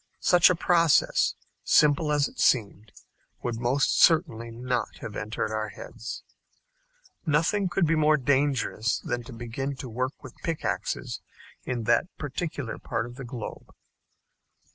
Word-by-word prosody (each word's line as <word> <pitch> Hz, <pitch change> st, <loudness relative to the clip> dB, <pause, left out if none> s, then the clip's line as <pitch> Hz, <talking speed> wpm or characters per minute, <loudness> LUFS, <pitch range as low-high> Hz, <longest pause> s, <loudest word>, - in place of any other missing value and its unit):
Such 180 Hz, -2 st, +6 dB
a 180 Hz, -, +3 dB
process, 170 Hz, -3 st, +3 dB, 0.3 s
simple 150 Hz, +1 st, +4 dB
as 145 Hz, -1 st, +3 dB
it -, -, -14 dB
seemed, 110 Hz, -3 st, +1 dB, 0.5 s
would 120 Hz, -2 st, -2 dB
most 130 Hz, +4 st, +2 dB
certainly 155 Hz, -9 st, +4 dB
not 125 Hz, +1 st, -3 dB
have 105 Hz, -, -7 dB
entered 110 Hz, 0 st, -3 dB
our 110 Hz, 0 st, -2 dB
heads. 115 Hz, -, -8 dB, 1.0 s
Nothing 175 Hz, +5 st, +1 dB
could 175 Hz, 0 st, +2 dB
be 165 Hz, -, +2 dB
more 155 Hz, -1 st, +4 dB
dangerous 135 Hz, -4 st, +1 dB
than 120 Hz, -, -3 dB
to 130 Hz, -, -10 dB
begin 120 Hz, +4 st, -4 dB
to 130 Hz, -, -7 dB
work 130 Hz, +5 st, -4 dB
with 130 Hz, -, -10 dB
pickaxes 165 Hz, -2 st, -3 dB, 0.4 s
in 125 Hz, -2 st, -2 dB
that 110 Hz, -, +3 dB
particular 145 Hz, -4 st, -4 dB
part -, -, -2 dB
of 120 Hz, -, -9 dB
the 135 Hz, +2 st, -8 dB
globe. 120 Hz, -2 st, -7 dB
135 Hz, 140 wpm, -27 LUFS, 120-155 Hz, 1.0 s, Such